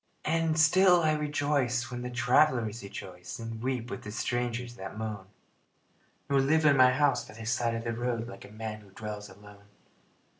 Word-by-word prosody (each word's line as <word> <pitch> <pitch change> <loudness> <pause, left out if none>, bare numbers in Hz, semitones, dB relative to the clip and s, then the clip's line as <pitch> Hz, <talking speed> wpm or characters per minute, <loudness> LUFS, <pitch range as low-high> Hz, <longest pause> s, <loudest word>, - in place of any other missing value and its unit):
And 160 0 +1
still 180 +2 +6
I 155 -1 +3
rejoice 145 -5 0
when 120 0 -4
the 125 - -4
travelers 125 -2 +2
rejoice 90 -2 -8
And 115 -1 -6
weep 125 -1 -2
with - - -5
the 105 - -7
strangers 120 +2 -2
that 95 -1 -8
moan, 105 -3 -5 1.0
Nor 140 -1 +3
live 155 +3 +2
in 145 -2 +6
my 130 -1 +7
house 140 0 +2
by 110 - -13
the 115 0 -8
side 115 0 0
of 115 - -4
the 115 0 -2
road 115 0 -2
Like - - -10
a - - -13
man 110 0 -6
who 100 - -18
dwells 105 +1 -7
alone. 100 +1 -15
120 Hz, 185 wpm, -29 LUFS, 110-140 Hz, 1.0 s, my